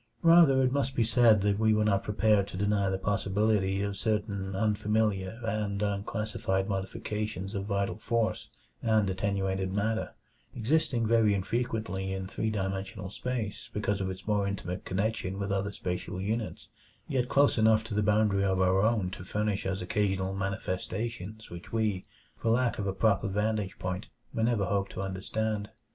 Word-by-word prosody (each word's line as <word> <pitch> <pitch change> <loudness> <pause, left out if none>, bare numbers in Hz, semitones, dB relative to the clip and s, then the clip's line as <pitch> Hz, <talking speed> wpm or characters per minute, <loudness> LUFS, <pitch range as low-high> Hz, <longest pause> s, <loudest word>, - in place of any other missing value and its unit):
Rather 165 -6 +7
must 135 +1 0
it - - -17
be 115 - +3
said 115 -2 +5
that 100 0 +2
we 110 -1 +4
were 105 0 +2
not 100 -2 +2
prepared 105 -1 +2
to 95 - -7
deny 100 0 +1
the 95 - 0
possibility 100 0 +1
of 100 -1 -2
certain 100 -2 -1
unfamiliar 105 0 0
and 105 -2 -1
unclassified 100 -1 -1
modifications 100 0 -3
of 100 -2 -3
vital 100 -1 -1
force 115 0 -1 0.3
and 110 -2 +3
attenuated 95 0 -1
matter; 110 +3 -1 0.4
existing 120 -1 +1
very 110 -2 +4
infrequently 100 -2 -2
in 95 0 -3
three 110 +3 -2
dimensional 95 -1 -3
space 120 -3 -4
because 105 -1 -1
of 95 - -1
its 95 0 -7
more 105 -2 +1
intimate 95 -2 -4
connection 95 0 -1
with 100 0 -2
other 100 +1 0
spatial 90 -1 -4
units, 110 +3 -3 0.4
yet 125 -2 0
close 140 -4 +4
enough 110 0 +5
to 110 -1 -6
the 105 - +2
boundary 105 -1 +3
of 95 -1 +1
our 95 +1 +3
own 105 -4 +1
to 90 - -7
furnish 105 +1 -1
us 95 0 -2
occasional 95 0 0
manifestations 100 +3 -4
which 85 0 -9
we, 110 -5 0 0.3
for 115 - -2
lack 120 0 +2
of 100 - -1
a - - +1
proper 100 +1 +2
vantage 105 -1 -1
point, 90 +2 -4 0.3
may 115 - -1
never 110 -3 +2
hope 100 +1 0
to - - -8
understand. 105 +2 -2
105 Hz, 165 wpm, -29 LUFS, 95-110 Hz, 0.4 s, Rather